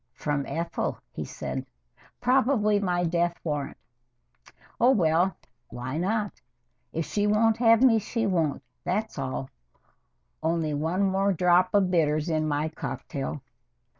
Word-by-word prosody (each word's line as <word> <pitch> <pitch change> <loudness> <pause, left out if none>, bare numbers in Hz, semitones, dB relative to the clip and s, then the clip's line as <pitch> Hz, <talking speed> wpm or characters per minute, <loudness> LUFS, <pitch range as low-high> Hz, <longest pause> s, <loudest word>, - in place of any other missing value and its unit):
"From 145 -2 -2
Ethel," 170 0 -2
he - - -5
said. - - -5 0.6
"Probably 245 -4 +3
my 180 -3 0
death 170 0 0
warrant. 150 -3 -3 1.0
Oh, 245 - +5
well 180 -5 +3 0.3
why 130 +5 -4
not? 205 +3 -1 0.5
If 165 0 -2
she 205 +5 0
won't 220 +1 +3
have 230 0 +5
me, 230 -4 +6
she 225 +2 -2
won't, 165 -8 0 0.2
that's 210 +5 -2
all. 130 0 -4 0.9
Only 160 -1 0
one 165 +6 0
more 195 +1 +2
drop 180 +2 +3
of 190 -3 +3
bitters 155 -2 +2
in 155 -1 0
my 150 +1 0
cocktail. 135 -1 -5
175 Hz, 130 wpm, -27 LUFS, 155-210 Hz, 1.0 s, me